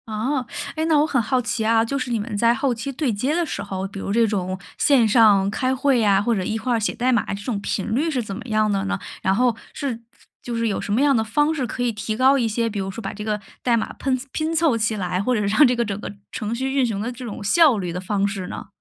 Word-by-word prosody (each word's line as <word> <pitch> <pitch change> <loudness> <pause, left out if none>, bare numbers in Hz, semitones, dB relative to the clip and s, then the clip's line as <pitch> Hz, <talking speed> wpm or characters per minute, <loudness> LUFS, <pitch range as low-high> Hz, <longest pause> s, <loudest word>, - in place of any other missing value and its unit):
啊， 235 +6 -1 0.3
哎， 315 0 -1
那 315 -2 +4
我 295 - +4
很 270 -6 +1
好 250 +4 +1
奇 225 -1 -2
啊， 225 0 +3
就 275 +4 -2
是 255 -1 -3
你 230 - 0
们 210 +1 -4
在 230 +2 +4
后 265 -1 0
期 240 +4 -5
对 265 -3 -1
接 255 +9 0
的 345 0 +1
时 - - -4
候， 190 0 -4
比 195 0 -9
如 195 - -4
这 230 +2 +4
种 185 -3 -2 0.2
线 260 -6 +4
上 210 -3 +5
开 255 +4 0
会 270 -1 +2
呀， 200 -3 +4
或 235 +3 +1
者 190 - -1
一 220 +4 -2
块 245 +2 -1
儿 230 - +2
写 210 - -1
代 250 +1 +1
码， 235 -4 +2
这 200 - -5
种 215 -2 -2
频 205 +1 -2
率 295 +8 +1
是 265 -6 -1
怎 200 -3 -6
么 - - -7
样 215 -1 +2
了 195 -1 0
呢？ 200 -1 -2 0.2
然 190 +1 +2
后， 245 0 +2 0.2
是 250 -5 -4 0.4
就 240 - -5
是 230 0 0
有 205 - -1
什 - - -5
么 235 - +2
样 285 -1 +4
的 220 - +2
方 295 +8 +1
式 270 -6 -2
可 245 - -3
以 245 - +1
提 215 0 -4
高 265 +2 +5
一 240 -4 +1
些， 230 +1 0
比 205 -2 -4
如 190 0 -3
说 195 +4 -6
把 195 - -5
这 210 - -7
个 210 -1 -1 0.2
代 240 -2 +2
码 220 - -3
喷 260 -2 -1
拼 315 +1 -2
凑 320 -6 +3
起 215 0 0
来， 180 -2 -1
或 250 +5 +1
者 215 - 0
让 210 +9 +5
这 250 - +1
个 235 0 0
整 200 -1 -4
个 - - -5 0.2
程 215 0 -3
序 265 +3 -2
运 275 -2 +3
行 220 -4 -2
的 225 +4 -3
这 250 +1 -9
种 215 -3 -6
效 295 +3 +5
率 180 -4 -3
的 180 - -4
方 200 +1 0
式 195 -3 -4
呢？ - - -7
230 Hz, 315 characters per minute, -22 LUFS, 205-255 Hz, 0.4 s, 上